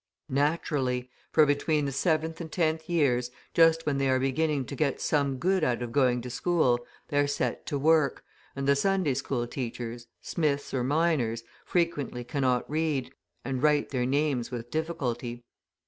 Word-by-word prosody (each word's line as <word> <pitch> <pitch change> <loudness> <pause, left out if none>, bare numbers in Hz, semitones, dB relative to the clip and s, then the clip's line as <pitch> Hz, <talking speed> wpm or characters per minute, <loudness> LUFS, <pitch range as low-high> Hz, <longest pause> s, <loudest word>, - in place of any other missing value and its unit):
Naturally, 135 -3 0 0.2
for 155 - +6
between 145 +1 +1
the 140 - -1
seventh 160 +3 0
and 160 -2 -7
tenth 160 -1 0
years, 130 -7 +2 0.2
just 165 0 +5
when 140 -2 0
they 135 -1 +1
are 130 - +3
beginning 140 +1 0
to 140 - -6
get 140 -2 0
some 140 -3 +1
good 185 +5 +1
out 125 -4 +1
of 120 - -5
going 125 -2 +2
to 125 - -6
school, 145 -5 +2 0.3
they 145 - +1
are 145 - +3
set 135 -4 -2
to 145 - -1
work, 155 0 +3 0.3
and 135 0 -3
the 140 - +5
Sunday 190 -2 +1
school 130 -2 -2
teachers, 120 -1 -5
smiths 145 -4 -1
or 130 -2 0
miners, 135 -6 +1 0.2
frequently 150 -8 -1
cannot 130 -2 0
read, 145 -4 -1 0.3
and 130 -1 -2
write 150 -1 +3
their 125 -2 -1
names 140 -3 0
with 120 -1 -6
difficulty. 125 -7 -3
140 Hz, 165 wpm, -28 LUFS, 125-155 Hz, 0.3 s, for